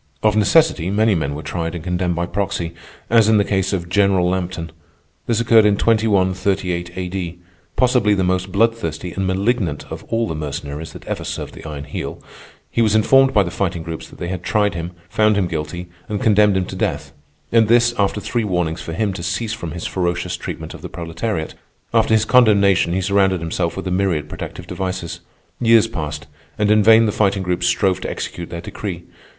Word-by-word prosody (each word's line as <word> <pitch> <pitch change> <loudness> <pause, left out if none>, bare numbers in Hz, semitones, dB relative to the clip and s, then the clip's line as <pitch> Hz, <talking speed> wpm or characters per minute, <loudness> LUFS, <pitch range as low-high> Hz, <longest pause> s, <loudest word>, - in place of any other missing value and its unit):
Of 110 -1 +3
necessity, 105 - +3
many 110 +2 +3
men 70 -5 -1
were 75 - -6
tried 85 0 -3
and 85 - -6
condemned 90 -1 -1
by 85 +1 -1
proxy, 90 -3 -2 0.3
as 115 -2 +4
in 110 - +5
the 100 - +4
case 95 -2 0
of 90 -4 -2
General 95 -1 +3
Lampton. 90 -2 -3 0.6
This 115 -2 +1
occurred 115 -1 +5
in 105 -1 +3
2138 95 -5 +1
A.D. 90 -2 -4 0.4
Possibly 125 -5 +3
the 95 - 0
most 95 +1 0
bloodthirsty 100 -6 0
and 95 +1 -2
malignant 95 -4 0
of - - -6
all 115 0 -1
the - - -3
mercenaries 75 0 -5
that - - -11
ever - - -4
served - - -5
the - - -11
Iron 75 -2 -6
Heel, 70 - -6 0.5
he 115 - +1
was 110 -2 +3
informed 135 +5 +5
by 105 -5 +4
the 85 - -5
Fighting 85 -4 -2
Groups 80 -1 -6
that - - -14
they 85 - -4
had 90 -1 -4
tried 105 +1 +1
him, 85 +1 -5
found 105 +3 +2
him 100 - +2
guilty, 85 +2 -4 0.2
and 105 -1 -2
condemned 105 -2 +4
him 95 - 0
to - - -7
death—and 75 +10 -1
this, 120 +1 +4
after 100 +1 +1
three 115 +2 -2
warnings 90 -4 -1
for 80 - -6
him 100 +3 -1
to 95 - -6
cease 110 +5 -2
from 85 -6 -5
his 85 +2 -6
ferocious 90 -2 -1
treatment - - -6
of - - -11
the - - -7
proletariat. 85 +1 -4 0.4
After 115 -1 +4
his 110 0 +2
condemnation 100 -8 +4
he 95 - 0
surrounded 95 -1 +2
himself 85 +2 -2
with 95 - -4
a 90 - -2
myriad 90 -5 0
protective 90 - -7
devices. 90 -1 -4 0.4
Years 115 -2 +5
passed, 75 -7 -5 0.3
and 105 0 +2
in 105 0 +5
vain 110 +2 +6
the 105 - +1
Fighting 100 -2 +1
Groups 90 -1 0
strove 95 -3 +1
to - - -3
execute 85 -1 -5
their 85 - -6
decree. 90 -1 -6
95 Hz, 200 wpm, -20 LUFS, 85-105 Hz, 0.6 s, vain